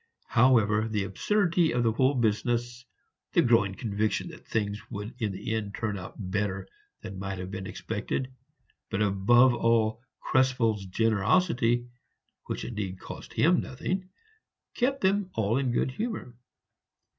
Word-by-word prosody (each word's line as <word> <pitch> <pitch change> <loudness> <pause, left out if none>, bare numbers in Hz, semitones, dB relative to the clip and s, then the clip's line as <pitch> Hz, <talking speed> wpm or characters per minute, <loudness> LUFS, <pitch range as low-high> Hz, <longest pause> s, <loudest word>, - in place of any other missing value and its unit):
However, 110 -3 +4
the 105 -3 -1
absurdity 170 - +1
of 120 0 +1
the 115 - +3
whole 130 +5 +2
business, 120 +2 0 0.5
the - - +5
growing 105 -5 +3
conviction 110 0 -1
that - - -13
things 105 -1 -1
would 105 -1 -6
in 110 -4 0
the 95 +3 -4
end 105 -2 -3
turn 110 -3 -2
out 95 -2 -8
better 95 -1 -2 0.3
than 95 0 -7
might 95 0 -4
have 90 +1 -6
been 95 -1 -5
expected, 130 0 -4 0.6
but 105 - 0
above 120 +6 +5
all, 115 -1 +2 0.2
Krespel's 120 -6 +1
generosity 115 - +2 0.6
which - - -4
indeed 100 -5 -4
cost - - -9
him 170 +3 +4
nothing 185 +8 -4 0.6
kept 270 +3 0
them 195 0 +2
all 110 +3 +1
in 130 -3 0
good 120 - 0
humor. 215 - -4
115 Hz, 140 wpm, -28 LUFS, 100-130 Hz, 0.6 s, the